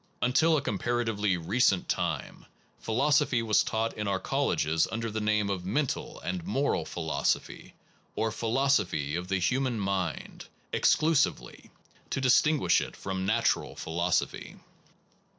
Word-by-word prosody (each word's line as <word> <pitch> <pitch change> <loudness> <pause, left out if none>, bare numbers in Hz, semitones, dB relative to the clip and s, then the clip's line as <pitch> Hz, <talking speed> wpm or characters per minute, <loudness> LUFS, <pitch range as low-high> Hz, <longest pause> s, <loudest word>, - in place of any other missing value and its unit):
Until 155 +6 +3
a 140 - -2
comparatively 105 -3 0
recent 95 +3 +1
time, - - -3 0.3
philosophy 125 0 +2
was 110 -2 +3
taught 110 +1 -1
in 105 -1 -3
our 95 -1 0
colleges 80 -2 0
un 110 - -3
der 115 -1 -3
the 110 +1 -3
name 105 -1 +1
of 95 -2 -3
mental 145 +9 -2
and 180 -2 -4
moral 140 - 0
philoso 80 -2 0
phy, - - -13 0.4
or 110 0 0
philosaphy 115 - 0
of 90 +1 -4
the 95 +1 0
human 125 +5 0
mind, 95 -3 -3 0.3
exclusively, 155 -2 +1 0.4
to - - -2
distinguish 140 +3 +3
it - - -6
from 95 -1 -4
natural 115 +2 +1
philosophy. 85 +2 -2
110 Hz, 135 wpm, -28 LUFS, 95-130 Hz, 0.4 s, Until